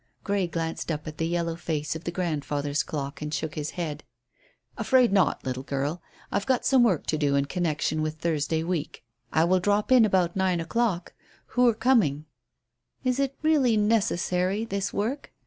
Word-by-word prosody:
Grey 200 -3 0
glanced 165 0 -3
up 150 -1 -4
at 155 -1 -8
the 165 - 0
yellow 170 -1 -1
face 160 -2 -3
of 160 - -8
the 170 - -2
grandfather's 145 -4 -1
clock 140 -1 -5
and 150 0 -4
shook 150 +1 -3
his 150 0 -3
head. 155 -4 -3 0.7
"Afraid 255 -5 +3
not, 190 -7 +2
little 130 0 -3
girl. 140 +4 -3 0.3
I've 200 +3 -1
got 260 -2 +1
some 265 -2 +5
work 205 -10 +2
to 155 - -1
do 145 -2 +2
in 140 0 +2
connection 155 -1 -1
with 155 0 -2
Thursday 160 -1 -1
week. 165 -7 -3 0.3
I 160 - +3
will 185 +2 +3
drop 205 +5 +1
in 255 -3 +7
about 185 -5 +2
nine 190 -2 +1
o'clock. 180 +1 -1 0.4
Who're 245 -2 +4
coming?" 215 - +2 0.8
"Is 255 0 0
it 275 -1 0
really 280 -8 +3
necessary, 205 -2 +1
this 200 -3 -2
work?" 245 +8 -3
175 Hz, 175 wpm, -26 LUFS, 155-210 Hz, 0.8 s, in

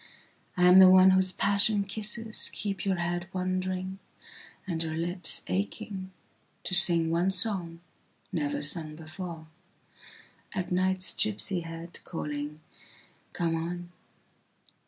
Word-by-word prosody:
I 180 - +2
am 180 +1 +7
the 190 -1 +9
one 185 0 +7
whose 185 0 +2
passion 200 +1 +2
kisseskeep 210 -1 -1
your 195 -1 +1
head 175 0 -3
wonderingand 185 +1 -3 0.8
your 160 -1 -2
lips 175 +1 +2
achingto 100 - -4 0.6
sing 170 -2 +4
one 170 +3 +1
songnever 190 - -1
sung 155 -3 +1
beforeat 170 +3 -10
night's 185 -1 0
gipsy 200 -3 -1
headcalling: 165 -3 -7 0.8
Come 165 -1 -1
on. 175 +2 -5
180 Hz, 95 wpm, -28 LUFS, 165-190 Hz, 0.8 s, the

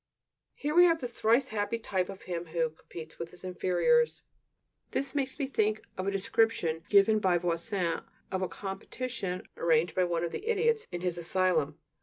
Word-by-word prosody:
Here 295 +1 -2
we 350 +2 +8
have 330 -2 +4
the 250 - -3
thrice 235 +2 +2
happy 210 +1 -1
type 190 -5 -1
of 195 -1 -8
him 175 -1 -4
who 160 -1 0
competes 160 0 -11
with 170 - -4
his 180 +1 -15
inferiors! 185 - +2 0.7
This 275 0 -2
makes 270 -3 -1
me 285 - 0
think 215 -5 0
of 185 +1 -3
a - - +2
description 195 -5 +1
given 210 +1 +6
by 185 -4 +3
Voisin 170 0 -1 0.3
of 190 - -1
a 185 - +1
competition 195 0 -5
arranged 165 0 +3
by 185 - +2
one 170 -1 -1
of 170 - -1
the 425 - -6
idiots 460 0 +2
in 175 -1 -4
his 175 -1 -1
asylum. 170 -4 +1
190 Hz, 180 wpm, -30 LUFS, 175-235 Hz, 0.7 s, we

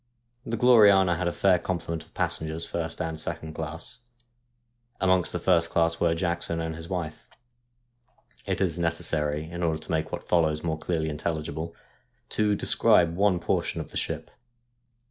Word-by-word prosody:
The 115 - -2
Gloriana 100 -7 +6
had 90 0 -2
a - - +1
fair 90 0 +3
complement 85 -3 -3
of - - -25
passengers, 80 +1 -1
first 80 -1 -3
and 80 -1 -3
second 80 -1 -4
class. 80 +10 -5 1.0
Amongst 95 -2 +3
the - - -1
first 85 -1 +2
class 85 0 +1
were 85 -1 +2
Jackson 85 -1 -1
and 80 -1 -3
his 80 +1 -9
wife. 85 -5 -5 1.2
It - - -1
is 90 -3 0
necessary, 80 -3 0
in 85 +1 -6
order 80 -2 +1
to - - -6
make 80 -1 -1
what - - -6
follows 80 -3 +2
more 80 -2 -2
clearly 80 -1 -1
intelligible, 80 +1 -4 0.5
to 105 -1 +1
describe 85 -3 +3
one 100 -1 +3
portion - - -1
of - - -7
the - - -4
ship. - - -3
85 Hz, 160 wpm, -27 LUFS, 80-90 Hz, 1.2 s, Gloriana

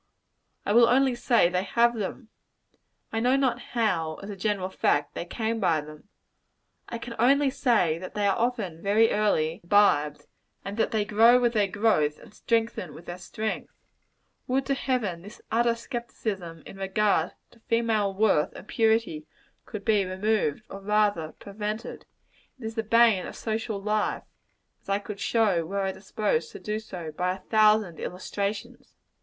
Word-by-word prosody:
I 205 - +1
will 235 +1 +6
only 265 +1 +4
say 240 -5 +3
they 180 +1 0
have 235 +4 +2
them. 220 +2 -5 0.8
I 225 - 0
know 250 +3 +3
not 270 -2 +1
how, 175 -9 -1
as 205 - -6
a - - -6
general 195 -1 -2
fact, 145 -5 +1
they - - -5
came 225 +4 -2
by 170 -6 +2
them. 150 +5 -13 0.8
I 235 - -4
can 235 +1 -7
only 275 +3 +4
say 210 - +2
that 185 - -9
they 205 -1 0
are 200 - +3
often 220 -9 -2
very 215 +3 +3
early 175 -5 +1
imbibed; 170 -6 +3 0.4
and 200 +1 -5
that - - +2
they 215 -2 0
grow 225 +4 +6
with 240 -1 +2
their 210 -3 +2
growth, 185 -7 +1
and - - -16
strengthen 230 +1 -1
with 170 - -12
their 175 +1 -7
strength. 215 +3 -4 0.8
Would 265 +2 0
to 275 - +1
Heaven 240 -11 -1
this 205 +5 -12
utter 235 +1 +2
skepticism 215 - -5
in 195 - -11
regard 195 -3 +1 0.2
to 235 - -21
female 225 -3 +1
worth 195 -6 +2
and 200 - -11
purity 220 -9 +1 0.4
could 205 -2 -7
be 210 -3 +3
removed; 190 -2 -1
or 195 - -9
rather 205 -6 +1
prevented. 210 +2 -6 0.5
It 235 - -8
is 220 - -4
the 225 - -1
bane 225 -3 +4
of - - -9
social 220 -1 -3
life 210 +1 -1 0.6
as - - -16
I 195 - +2
could 205 0 -8
show, 205 -7 +2
were 195 +5 -3
I 195 0 0
disposed 190 -4 -2
to - - -8
do 215 0 -3
so, 180 -7 -7
by 180 +4 -1
a - - -12
thousand 215 -5 +3
illustrations. 200 +3 -5
210 Hz, 170 wpm, -27 LUFS, 185-230 Hz, 0.8 s, will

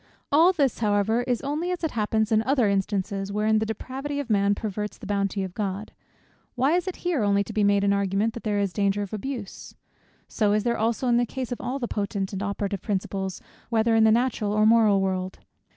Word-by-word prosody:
All 325 +5 +6
this, 285 -9 0
however, 215 +1 +2
is 245 -2 0
only 300 +5 -2
as 360 -1 -3
it 320 - 0
happens 220 0 0
in 220 0 +4
other 255 -2 +2
instances, 195 0 -1
wherein 215 +1 +2
the 220 - -2
depravity 270 +6 -4
of 265 -5 -4
man 200 -1 +3
perverts 210 0 -4
the 235 - -11
bounty 200 -1 -1
of 185 -2 -6
God. 200 0 -4 0.6
Why 265 +3 +2
is 360 +1 -1
it 370 - -3
here 345 -8 +1
only 200 -1 +2
to 220 - -9
be 210 -1 +1
made 200 0 +3
an 200 0 +3
argument, 200 +3 0
that 235 - -7
there 210 -2 0
is 200 -3 0
danger 200 0 +1
of 200 - -8
abuse? 220 -2 -6 0.5
So 210 -2 +1
is 210 0 +1
there 235 -1 +1
also 230 +3 0
in 240 -1 +4
the 240 - +2
case 260 0 -5
of 245 - -4
all 250 +2 -3
the 245 -3 -3
potent 200 -2 -3
and 195 - -3
operative 200 -1 -3
principles, 190 -2 -3 0.3
whether 225 0 +2
in 225 0 +5
the 220 - +6
natural 230 -3 +1
or 215 0 +3
moral 215 -3 +5
world. 185 -1 -2
215 Hz, 220 wpm, -25 LUFS, 200-240 Hz, 0.6 s, All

